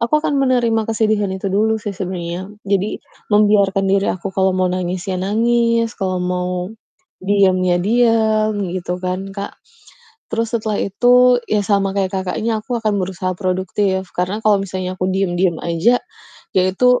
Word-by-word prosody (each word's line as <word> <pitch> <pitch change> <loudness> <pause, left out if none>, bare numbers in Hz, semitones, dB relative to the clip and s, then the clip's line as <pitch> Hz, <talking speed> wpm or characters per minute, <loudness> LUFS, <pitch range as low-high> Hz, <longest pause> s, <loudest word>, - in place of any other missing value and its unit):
Aku 235 +6 +2
akan 285 -3 +1
menerima 240 -4 +2
kesedihan 215 -2 +1
itu 190 +1 -3
dulu 220 +2 +2
sih 210 -2 -5
sebenernya, 180 -1 -5 0.2
jadi 200 +1 0 0.3
membiarkan 205 -2 +3
diri 195 0 +2
aku 190 +2 -3
kalau 190 -1 +1
mau 185 -1 +1
nangis 180 0 -3
ya 185 -2 -3
nangis, 230 +3 +1
kalau 190 -2 -2
mau 180 0 -1 0.7
diem 195 -1 +3
ya 175 -1 +2
diem, 220 +1 +2 0.2
gitu 180 0 -3
kan, 185 +2 -4
Kak. 200 +1 -6 0.8
Terus 230 +1 -2
setelah 215 -2 -1
itu 245 +4 +4
ya 215 - +3
sama 200 -2 +2
kayak 195 -1 0
Kakaknya, 220 +3 -2
aku 245 0 -3
akan 215 -2 0
berusaha 185 0 -3
produktif 190 0 -1
karena 180 +4 -1
kalau 205 -2 +4
misalnya 185 -1 -4
aku 185 0 -1
diem-diem 185 -2 0
aja, 170 +9 +3 0.6
ya 185 - +5
itu 250 +5 +3
195 Hz, 155 wpm, -18 LUFS, 185-220 Hz, 0.8 s, ya